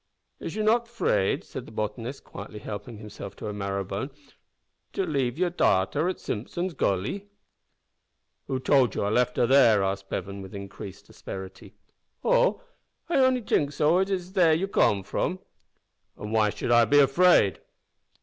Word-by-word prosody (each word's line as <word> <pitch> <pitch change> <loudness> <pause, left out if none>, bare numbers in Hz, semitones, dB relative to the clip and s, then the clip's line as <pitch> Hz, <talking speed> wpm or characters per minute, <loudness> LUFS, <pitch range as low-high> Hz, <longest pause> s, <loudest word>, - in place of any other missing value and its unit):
"Is - - -6
you 215 - -1
not 230 +2 +3
'fraid," 230 - 0
said - - -8
the - - -11
botanist, 115 +4 -4
quietly 105 +1 -9
helping 105 +2 -7
himself 105 -2 -9
to - - -8
a 105 - -4
marrow 100 -1 -2
bone, 100 +8 -4 0.8
"to 195 - -1
leave 135 -6 -1
you's 180 0 +1
darter 95 - +2
at 185 - -4
Simpson's 175 - -4
Gully?" 130 - -1 1.2
"Who 130 -2 -1
told 130 -4 +3
you - - -1
I 100 - 0
left 125 +2 +1
her - - +4
there?" 120 -6 +5
asked 95 0 -3
Bevan, 100 +1 -4
with 95 +1 -10
increasing 100 0 -9
asperity. 95 -1 -9 0.5
"Oh! - - +2 0.5
I 345 - +2
only 260 -2 +3
t'ink 145 -7 +1
so, 155 +5 +3
as 190 +1 +1
you's 185 -2 -3 0.4
come 100 -2 +3
from 180 - -1
dere." 185 - -20 0.8
"An' 105 - -6
why 110 -1 +3
should 120 - -3
I 120 -1 +6
be 130 +7 +3
afraid?" 140 - +5
120 Hz, 160 wpm, -26 LUFS, -, 1.2 s, I